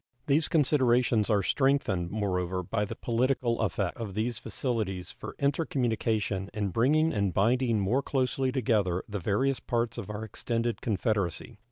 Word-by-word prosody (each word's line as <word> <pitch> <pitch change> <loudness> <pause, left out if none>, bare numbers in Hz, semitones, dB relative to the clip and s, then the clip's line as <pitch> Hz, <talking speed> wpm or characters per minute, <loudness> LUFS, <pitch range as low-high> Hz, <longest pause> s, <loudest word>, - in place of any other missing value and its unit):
These 150 +1 +3
considerations 125 -7 +3
are 105 -3 +3
strengthened, 135 - +1
moreover, 90 -3 -1
by 105 +4 -1
the - - -6
political 120 0 0
effect 100 -3 -1
of 105 -5 -6
these 115 +1 -1
facilities 105 -8 -3
for - - -9
intercommunication 115 - 0
in 105 -2 -1
bringing 150 - +2
and 100 -2 +1
binding 115 +2 +2
more 105 +8 +1
closely 130 -1 0
together 105 -8 +1
the 105 -1 -4
various 125 +9 +1
parts 120 -2 -1
of 105 - -7
our 105 +1 -5
extended 115 +1 -2
confederacy. 105 +1 -1
115 Hz, 145 wpm, -29 LUFS, 100-130 Hz, -, These